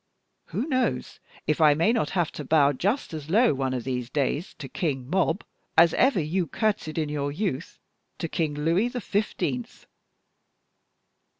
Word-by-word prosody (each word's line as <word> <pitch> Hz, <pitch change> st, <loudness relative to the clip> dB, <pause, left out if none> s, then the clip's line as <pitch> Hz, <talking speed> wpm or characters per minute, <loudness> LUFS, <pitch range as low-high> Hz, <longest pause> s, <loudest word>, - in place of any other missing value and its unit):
Who 250 Hz, -, -3 dB
knows 255 Hz, -4 st, -1 dB, 0.3 s
if 155 Hz, +1 st, 0 dB
I 150 Hz, -2 st, +7 dB
may 170 Hz, +9 st, +3 dB
not 220 Hz, -11 st, 0 dB
have 170 Hz, -3 st, +1 dB
to 150 Hz, -, -6 dB
bow 145 Hz, 0 st, +4 dB
just 200 Hz, -, -1 dB
as 155 Hz, -1 st, -6 dB
low 225 Hz, +4 st, +4 dB
one 135 Hz, -1 st, -1 dB
of 125 Hz, -2 st, -2 dB
these 125 Hz, -2 st, -3 dB
days 145 Hz, +4 st, -1 dB
to -, -, -8 dB
King 135 Hz, -8 st, -2 dB
Mob 185 Hz, +2 st, +1 dB, 0.3 s
as 165 Hz, 0 st, +7 dB
ever 260 Hz, -7 st, +3 dB
you 165 Hz, +3 st, 0 dB
courtesied 205 Hz, -8 st, -1 dB
in 155 Hz, -2 st, 0 dB
your 145 Hz, -1 st, -2 dB
youth 165 Hz, -3 st, -3 dB, 0.4 s
to 165 Hz, -, -3 dB
King 160 Hz, -3 st, -1 dB
Louis 165 Hz, +9 st, +2 dB
the 245 Hz, 0 st, -4 dB
Fifteenth?" 220 Hz, +3 st, -2 dB
160 Hz, 165 wpm, -26 LUFS, 145-205 Hz, 0.4 s, I